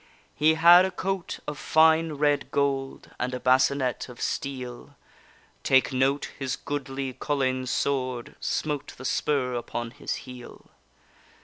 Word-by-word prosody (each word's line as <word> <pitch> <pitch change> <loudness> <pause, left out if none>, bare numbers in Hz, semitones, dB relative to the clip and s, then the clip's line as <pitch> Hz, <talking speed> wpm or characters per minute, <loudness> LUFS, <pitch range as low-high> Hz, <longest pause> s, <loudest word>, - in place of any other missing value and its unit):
He 155 +2 +3
had 170 +3 +8
a 190 - 0
coat 190 0 -3
of 150 -1 -5
fine 160 0 +4
red 145 -1 +1
gold, 135 -1 -2
And 125 +1 -2
a - - -4
bascinet 130 0 +2
of 125 - -12
steel; 125 -3 -5 0.7
Take 130 0 +3
note 135 +2 +1
his 135 -1 -2
goodly 135 -2 -4
Collayne 130 -2 -1
sword 130 -2 -2
Smote 145 -2 -3
the 130 - -9
spur 130 -2 0
upon 120 -1 -4
his - - -4
heel. 125 -2 -12
135 Hz, 130 wpm, -26 LUFS, 130-150 Hz, 0.7 s, had